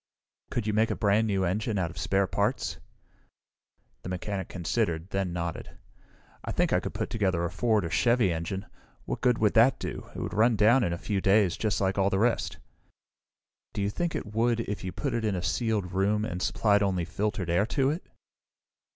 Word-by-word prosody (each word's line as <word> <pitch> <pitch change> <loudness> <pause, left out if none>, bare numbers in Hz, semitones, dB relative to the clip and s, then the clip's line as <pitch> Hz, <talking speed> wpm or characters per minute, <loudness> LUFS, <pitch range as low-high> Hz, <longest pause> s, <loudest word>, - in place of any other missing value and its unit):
"Could 120 - -2
you 105 - 0
make 110 +2 +3
a - - -1
brand 105 +1 +2
new 100 -2 +1
engine 105 +4 -1
out 85 -4 -1
of - - -14
spare 100 0 +1
parts?" 90 - -1 1.2
The - - -7
mechanic 95 +1 -4
considered, 90 -1 -2
then 95 -2 -1
nodded. 85 -1 -5 0.7
"I - - -4
think - - +1
I - - +4
could - - -6
put - - -3
together 95 -6 0
a 85 - -3
Ford 105 +1 +1
or 85 - -4
Chevy 120 -6 +3
engine. 85 +5 -4 0.4
What - - -4
good 125 -2 +3
would 105 -2 +2
that 115 +4 +5
do? - - -6
It - - -5
would - - -4
run 115 +2 +4
down 115 +5 +5
in 85 - 0
a 85 - -2
few 100 +2 -2
days, 95 -2 +3
just 110 -2 -1
like 95 0 0
all 100 0 +3
the 95 - 0
rest." 100 -7 +1 1.2
"Do 105 - -3
you 100 - 0
think 170 +8 -2
it 105 - -5
would, 115 +1 +2
if 105 -4 -4
you 95 - -3
put 140 +6 -3
it 115 - -1
in 105 -3 0
a 90 - -3
sealed 105 -4 -1
room, 100 +3 +1
and 90 -3 -4
supplied 105 0 +2
only 95 -4 0
filtered 90 0 -2
air 100 +5 +2
to 135 0 +1
it?" 165 +5 -4
100 Hz, 205 wpm, -28 LUFS, 90-110 Hz, 1.2 s, that